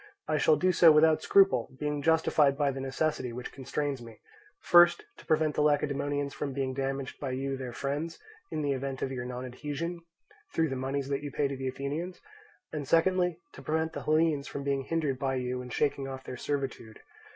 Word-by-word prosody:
I 155 -1 +1
shall 155 - +5
do 185 +5 +2
so 170 -2 +7
without 155 +1 +5
scruple, 175 -13 +4
being 150 -1 -2
justified 155 -3 +3
by 145 -2 +2
the 135 - -6
necessity 135 -1 -1
which 125 +1 -6
constrains 140 0 -3
me, 115 -2 -11 0.4
first, 175 0 +6
to - - -15
prevent 155 -1 +2
the - - 0
Lacedaemonians 145 -1 +1
from 140 -2 -4
being 130 -1 -2
damaged 135 0 -3
by 140 - -3
you, 135 +1 -2
their 130 -2 -5
friends, 145 +6 -3 0.3
in 155 - -3
the 145 - +1
event 135 0 -3
of 135 - -2
your 125 -2 -4
nonadhesion, 140 +7 -5 0.6
through 160 -1 +2
the 135 - -2
moneys 135 +1 -2
that 140 0 -1
you 145 - -5
pay 145 - +1
to 140 - -4
the 130 0 -4
Athenians; 145 +7 -4 0.5
and 145 -3 -4
secondly, 180 +1 +3 0.2
to - - -11
prevent 160 +1 -1
the - - -5
Hellenes 155 -2 +2
from 140 - -5
being 140 -1 -1
hindered 150 -6 -1
by 135 -1 0
you 125 0 -2
in 125 - -8
shaking 140 +1 0
off 130 -1 -7
their 125 - -6
servitude. 130 -5 -4
140 Hz, 195 wpm, -29 LUFS, 135-155 Hz, 0.6 s, so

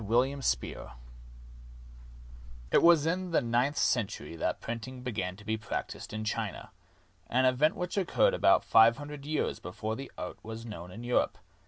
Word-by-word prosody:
WILLIAM 125 +6 +1
SPEER - - -2 1.8
It - - +5
was 165 -3 +6
in 180 +2 -1
the 165 - +3
ninth 125 +4 +1
century 100 - 0
that 80 - -1
printing 125 +2 -6
began 105 -7 -3
to 105 +2 -15
be 110 0 -1
practiced 110 - -5
in 110 0 -4
China 110 -3 -3 0.3
— 90 +1 -35
an 130 +2 +3
event 130 +5 +3
which 180 +2 -4
occurred 345 - +3
about - - +4
five 115 +1 +6
hundred 145 -1 -8
years 155 0 -1
before 110 +5 -4
that 135 0 -7
art - - -6
was 110 +1 -7
known 90 -6 -8
in 110 +6 -9
Europe. 120 0 +1
120 Hz, 165 wpm, -30 LUFS, 110-145 Hz, 1.8 s, was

